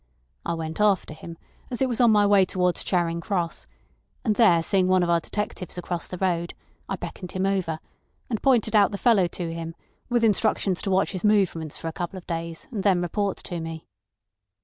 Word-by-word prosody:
I 170 - -2
went 160 +3 -4
after 200 -6 +2
him, 165 +2 -10 0.3
as 245 - -4
it 265 - +2
was 245 -1 -1
on 240 - +6
my 210 -1 +5
way 200 -1 +5
towards 180 -1 0
Charing 170 -2 0
Cross, 175 -2 -3 0.6
and 220 - +3
there 175 -8 +5
seeing 185 +2 +2
one 185 -1 +4
of 170 - +1
our 170 - +4
detectives 185 -1 -5
across 175 -1 -4
the 180 - -6
road, 170 -2 -1 0.3
I - - -1
beckoned 180 -2 -7
him 185 +1 0
over, 190 -5 0 0.5
and 225 -4 -3
pointed 235 -5 +3
out 205 -1 +5
the 200 - -3
fellow 205 -5 +4
to 170 -1 -5
him, 165 0 -6 0.3
with 240 -1 +2
instructions 210 -3 +2
to - - -2
watch 190 0 +2
his 185 - -5
movements 190 -7 +1
for 165 - -6
a 165 - -4
couple 175 +1 -4
of 180 - -10
days, 165 -1 -5
and 215 -5 -3
then 190 -3 +3
report 200 +3 -1
to 175 - -5
me. 165 -1 -6
185 Hz, 205 wpm, -25 LUFS, 170-205 Hz, 0.6 s, on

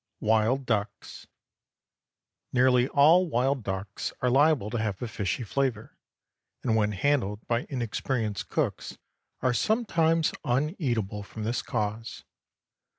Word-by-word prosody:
WILD 110 +5 +2
DUCKS. 105 -5 -3 1.2
Nearly 125 0 +4
all 165 +6 +5
wild 135 0 +1
ducks 95 -1 -4
are 125 - +1
liable 135 -5 +3
to 120 - -1
have 105 -3 -2
a 120 - -4
fishy 105 +2 -2
flavor, 120 -1 -2 0.7
and 115 -3 +1
when 105 -1 +1
handled 105 -2 0
by 120 0 -1
inexperienced 115 -3 -2
cooks, - - -2 0.4
are 130 -1 +2
sometimes 165 - +2
uneatable 120 - -1
from 110 +2 -8
this 115 +2 -1
cause. 105 +2 -4
120 Hz, 115 wpm, -27 LUFS, 105-140 Hz, 1.2 s, all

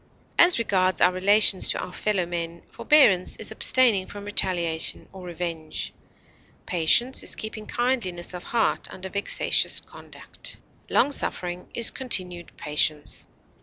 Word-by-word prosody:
As 350 +1 +6
regards 185 -5 0
our 180 - +4
relations 195 +1 +5
to - - -1
our 180 - -7
fellow 200 -4 -1
men, 170 -1 -6
forbearance 215 -12 +3
is 220 - -3
abstaining 220 -4 +3
from 205 0 -10
retaliation 175 -5 +1
or 185 -2 -11
revenge; 165 -2 -5 0.7
patience 185 +10 +2
is - - -2
keeping 215 -1 -7
kindliness 220 -9 -2
of 180 - -7
heart 230 +3 -1
under 190 0 -8
vexatious 200 +1 +1
conduct; - - -9 0.3
long 285 - +2
suffering 180 -9 -4
is 235 - +3
continued 180 -9 0
patience. 150 0 -1
185 Hz, 130 wpm, -24 LUFS, 175-220 Hz, 0.7 s, As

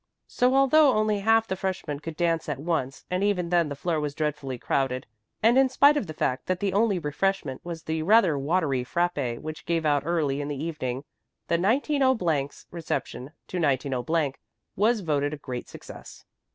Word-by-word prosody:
So 250 +1 +1
although 275 +1 +5
only 215 -1 +1
half 225 +2 +3
the 190 - -2
freshman 185 -6 -3
could 160 +1 -7
dance 165 -2 0
at 145 - -2
once 140 -3 -3
and 185 +2 0
even 185 -4 0
then 170 -3 +2
the 140 - -4
floor 165 +2 -1
was 145 -1 -3
dreadfully 150 -4 -3
crowded, 130 +1 -1 0.4
and 235 +4 +5
in 270 -1 +4
spite 285 +3 +5
of 260 -10 -1
the 155 - -6
fact 125 - -1
that 185 -1 0
the 195 -1 -1
only 205 -1 +2
refreshment 160 -2 -2
was 170 -2 -6
the 160 0 -2
rather 190 -2 +4
watery 140 -2 0
frappé 140 -5 -1
which 155 0 -8
gave 165 -1 0
out 145 -2 +3
early 150 -4 0
in 145 - -4
the 145 - -3
evening, 140 -4 -4 0.5
190 210 - +2
's - - -17
reception 160 -5 -4 0.2
to 185 - -5
190 140 0 0 0.4
was 220 +3 +2
voted 145 -3 0
a - - -12
great 125 -3 -6
success. - - -12
165 Hz, 180 wpm, -26 LUFS, 145-195 Hz, 0.5 s, although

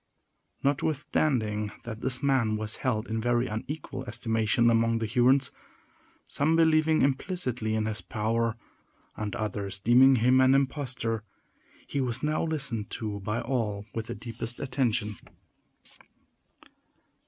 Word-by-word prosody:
Notwithstanding 135 -7 0
this 125 +4 -3
man 130 -6 +2
was 110 0 -4
held 110 -4 -1
in 110 0 -2
very 120 +1 +2
unequal 130 +4 -5
estimation 115 0 +1
among 115 0 +2
the 115 - -1
Hurons, 125 +4 +3 0.7
some 155 +3 +1
believing 160 -1 +4
implicitly 130 - -1
in 110 -1 0
his 110 -1 -3
power, 115 +1 -1 0.6
and 105 -2 -4
others 100 -2 -3
deeming 125 +6 +6
him 125 +2 +4
an 130 +1 +5
impostor, 130 -5 -1 0.6
he 140 - -2
was 125 +1 -1
now 150 +1 +1
listened 140 -9 -2
to 105 -2 -4
by 105 +3 -2
all 110 -5 -2
with 115 -1 -4
the - - -5
deepest 115 +1 -6
attention. 120 -6 -1
120 Hz, 120 wpm, -28 LUFS, 110-135 Hz, 0.7 s, deeming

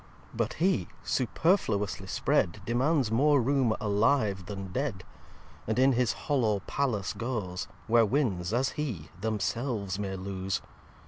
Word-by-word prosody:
iii - - -24
But 115 -1 0
He, 185 +3 +1 0.2
superfluously 110 - +1
spread, 85 0 +1
Demands 125 +1 +1
more 145 +5 +4
room 130 -2 +2
alive 105 -2 +1
then 95 -2 -6
dead. 120 -5 -2 0.6
And 110 - 0
in 130 +2 +5
his 125 -3 +2
hollow 115 -9 +2
Palace 120 -9 -1
goes 110 -7 -3 0.2
Where 115 0 +5
Winds 105 -7 0
as 125 +3 +2
he 115 - -4
themselves 105 -1 -2
may 95 -2 -3
lose. 95 0 -3
110 Hz, 130 wpm, -29 LUFS, 100-130 Hz, 0.6 s, in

